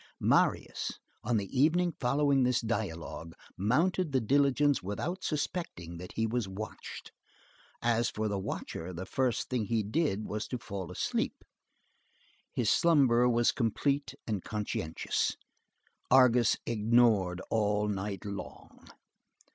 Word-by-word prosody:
Marius, - - +1 0.3
on 115 0 +1
the 100 - -1
evening 165 +6 +3
following 140 +2 +2
this 125 -1 +3
dialogue, 85 -7 -4 0.2
mounted 160 - +1
the 135 - +3
diligence 140 +3 +3
without 170 - -4
suspecting 145 - -3
that 90 - -9
he 110 - 0
was 115 -1 -1
watched. 100 +3 -7 0.7
As 120 0 +2
for 110 0 -2
the 100 -2 -1
watcher, 90 -1 -5
the 90 +2 -5
first 125 +2 0
thing 125 -4 -1
he 115 0 0
did 110 -2 0
was 105 0 -4
to 125 - -3
fall 100 -6 -6
asleep. - - -2 1.1
His - - +1
slumber 130 -7 +4
was 120 0 +3
complete 140 +4 0
and 105 -5 -2
conscientious. 105 -7 -2 0.7
Argus 125 -2 +5
snored 110 -5 +3
all 105 -1 +1
night 100 -2 -3
long. 100 -1 -8
115 Hz, 125 wpm, -31 LUFS, 100-135 Hz, 1.1 s, Argus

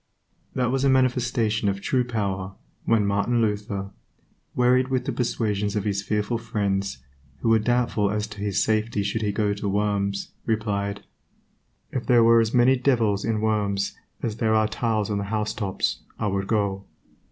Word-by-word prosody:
That 125 -1 +1
was 135 0 0
a 140 - +4
manifestation 120 -5 +2
of 100 0 -2
true 125 +5 +1
power 100 -5 -3 0.3
when 110 -3 +3
Martin 100 +4 +1
Luther, 105 -3 -2 0.6
wearied 125 +1 +3
with 130 -1 -1
the - - -1
persuasions 105 -4 -1
of 105 - 0
his 100 -1 -1
fearful 105 +3 -1
friends, 100 - -1 0.4
who 115 - +1
were 115 0 +5
doubtful 115 -3 +1
as 105 0 -1
to 105 -1 -9
his 100 -1 +1
safety 110 -1 0
should 100 +3 -2
he 105 -1 0
go 105 0 0
to 100 0 -3
Worms, 100 -1 -1
replied, 100 -2 -2 0.9
"If 130 - -3
there 120 -2 +6
were 115 0 +6
as 110 -1 0
many 125 +1 +4
devils 115 -6 +1
in 110 -1 0
Worms 105 -3 0 0.3
as 110 -2 -2
there 110 -1 +2
are 110 0 +3
tiles 110 -2 -1
on 100 - 0
the 100 - -3
housetops 105 -2 -1 0.2
I - - -2
would 100 -1 -1
go." 100 -3 0
105 Hz, 170 wpm, -25 LUFS, 100-115 Hz, 0.9 s, there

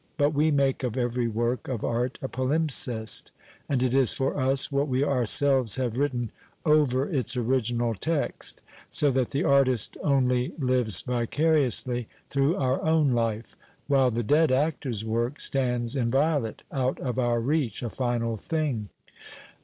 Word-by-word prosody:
But 145 -1 +2
we 150 +2 +2
make 140 -3 +1
of 125 -2 -3
every 120 -1 0
work 120 +2 -2
of 125 -5 -4
art 120 +2 -1
a - - -1
palimpsest, 130 -5 +1 0.4
and 130 -3 +1
it 130 -1 0
is 135 -4 +3
for 135 - -1
us 135 +1 +1
what 140 +1 0
we 130 0 0
ourselves 130 -2 +2
have 125 -4 -2
written 125 -5 -1 0.3
over 145 -4 +3
its 135 -6 0
original 120 -1 0
text 155 - -2
— - - -19
so 145 -2 +3
that 130 -2 0
the 140 - -1
artist 130 -5 +2
only 125 -3 +1
lives 125 - +1
vicariously, 125 -1 +1 0.2
through 140 +4 +2
our 130 -1 -1
own 160 -3 +2
life 115 -2 -2 0.2
— - - -36
while 135 -2 +3
the 120 0 -2
dead 150 +5 +3
actor's 130 -5 -1
work 115 +5 -2
stands 125 -2 0
inviolate, 135 0 0
out 130 -2 -1
of 125 -1 -3
our 120 -1 +1
reach, 130 -2 -1
a 115 - -4
final 120 -3 -2
thing. 135 -6 -3
130 Hz, 155 wpm, -26 LUFS, 120-140 Hz, 0.4 s, is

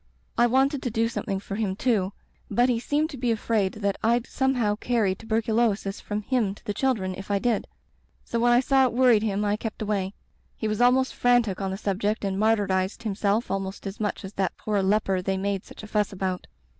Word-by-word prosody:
I 240 - +4
wanted 265 +3 +2
to 245 - -2
do 225 0 +1
something 200 -4 -3
for 195 - -8
him, 205 -4 -1
too, 205 -5 +1 0.4
but 240 +5 +3
he 235 -2 +2
seemed 300 +6 0
to 275 - -7
be 245 -1 0
afraid 215 -3 +1
that 200 -2 -2
Fd 235 +2 +2
some 265 0 0
how 210 -4 +1
carry 225 -5 +1
tuberculosis 220 -1 0
from 210 0 -4
him 215 -4 0
to - - -19
the 205 - -2
chil 260 +5 +2
dren 185 -3 -3
if 195 +2 -9
I 200 - +2
did; 230 +1 0 0.6
so 235 - -2
when 240 +1 +4
I 240 +1 +5
saw 265 0 +4
it 245 - -4
worried 245 -3 +5
him 210 -1 0
I 205 0 +1
kept 220 0 -5
away. 205 -2 -2 0.4
He 220 - -2
was 215 +1 -1
almost 255 +2 +4
frantic 240 -6 +2
on 195 - -1
the 190 - -3
subject 205 +1 -1
and 195 0 -1
martyrized 205 -2 +1
himself 210 +1 0
almost 195 0 -3
as 195 +1 -6
much 210 -2 -2
as 190 - -8
that 190 -2 -1
poor 210 -2 0
leper 195 -1 +1
they 190 +1 -1
made 195 0 -2
such - - -12
a - - -7
fuss 210 -1 0
about. 185 -2 -3
215 Hz, 220 wpm, -26 LUFS, 195-235 Hz, 0.6 s, I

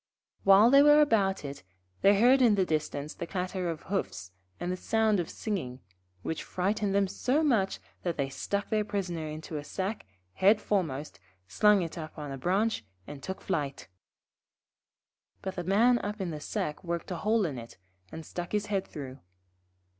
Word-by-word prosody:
While 200 +4 +7
they 275 +1 +8
were 295 +1 +7
about 200 - +2
it, 140 0 -6 0.4
they 200 0 +5
heard 255 +4 +6
in 230 -4 +5
the 190 -2 +2
distance 155 -2 -2
the 170 - -6
clatter 185 -1 -2
of 160 -2 -5
hoofs 95 - -3 0.3
and 175 +1 -2
the - - -1
sound 220 +1 +1
of 170 - -2
singing, 150 - -4 0.4
which 160 - -3
frightened 200 +2 -1
them 200 -1 +3
so 260 +10 0
much 225 -10 +2 0.2
that 175 -2 -2
they 140 -2 0
stuck 200 +9 -3
their 215 -1 +2
Prisoner 180 -6 -3
into 155 +1 -6
a 145 - -5
sack, 190 - -4 0.3
head 205 +3 +4
foremost, 160 -9 -2 0.3
slung 210 - +4
it 165 0 -6
up 155 0 -8
on 145 -2 -6
a 135 - -5
branch, 195 - +1 0.2
and 145 -1 -9
took 190 +6 -6
to - - -19
flight. 140 - -3 1.5
But 190 - -3
the 175 - -3
Man 230 +7 +4
up 210 +1 -4
in 185 -3 -2
the 155 - -5
sack 150 +2 -3
worked 170 +1 -4
a 180 - -2
hole 215 +1 +2
in 140 -7 -3
it, 115 0 -11 0.3
and 160 0 -8
stuck 175 +4 -6
his 210 0 +1
head 200 -2 -1
through. 135 -2 -8
190 Hz, 185 wpm, -29 LUFS, 155-210 Hz, 1.5 s, they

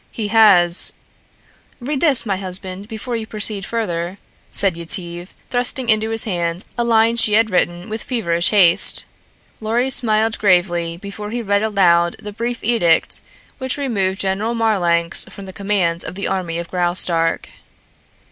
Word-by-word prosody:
He 215 -3 -4
has 195 -6 +5 0.4
" - - -34
"Read 270 +2 -3
this, 285 -8 +3
my 195 -3 -1
husband, 185 +1 -6
before 230 +2 -5
you 225 -1 -4
proceed 210 -2 -3
further," 180 -5 -3 0.3
said 195 -4 0
Yetive, 175 +1 -5 0.2
thrusting 245 0 -1
into 220 0 +1
his 225 0 0
hand 175 -3 -3
a 240 - 0
line 230 0 +3
she 220 -2 +1
had 220 0 +3
written 175 0 0
with 220 0 -5
feverish 170 -9 +1
haste. 185 -5 +5 0.5
Lorry 235 +4 0
smiled 225 -2 +1
gravely 175 -4 +1
before 200 +3 -8
he 235 +2 -4
read 200 -1 +1
aloud 175 -5 +2
the 210 0 -8
brief 235 +3 -4
edict 175 -8 +2 0.4
which 260 +1 -2
removed 200 -9 -1
General 200 +4 -1
Marlanx 175 -7 +1
from 200 - -11
the 190 - -10
command 190 -4 0
of - - -7
the 200 - -3
army 180 -3 -2
of 170 0 -5
Graustark. 175 -2 0
200 Hz, 155 wpm, -19 LUFS, 175-225 Hz, 0.5 s, has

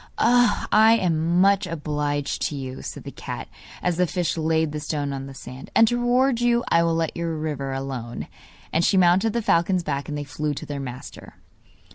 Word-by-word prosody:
'I 230 -2 +4
am 170 0 +1
much 200 0 +3
obliged 145 -3 -2
to 150 - -5
you,' 130 -2 -6
said - - -7
the - - -7
cat, - - -7 0.4
as 175 -2 0
the 180 0 +2
fish 175 0 -1
laid 160 -1 +1
the 150 - -4
stone 145 -2 -3
on 135 0 -5
the 135 - -10
sand, 130 0 -10
'and 225 - +6
to 240 - 0
reward 245 +1 +2
you, 240 0 +3
I 170 - +4
will 165 -1 +1
let 165 -1 -1
your 170 -1 -2
river 145 -3 -3
alone.' 135 -3 -5 0.5
And 165 - +2
she 190 - +3
mounted 185 +4 +4
the 235 -1 -1
falcon's 175 0 +2
back, 140 -2 -3
and 150 - -3
they 145 - -3
flew 145 +1 -3
to - - -6
their 145 -1 -5
master. 130 0 -8
160 Hz, 200 wpm, -24 LUFS, 145-190 Hz, 0.5 s, and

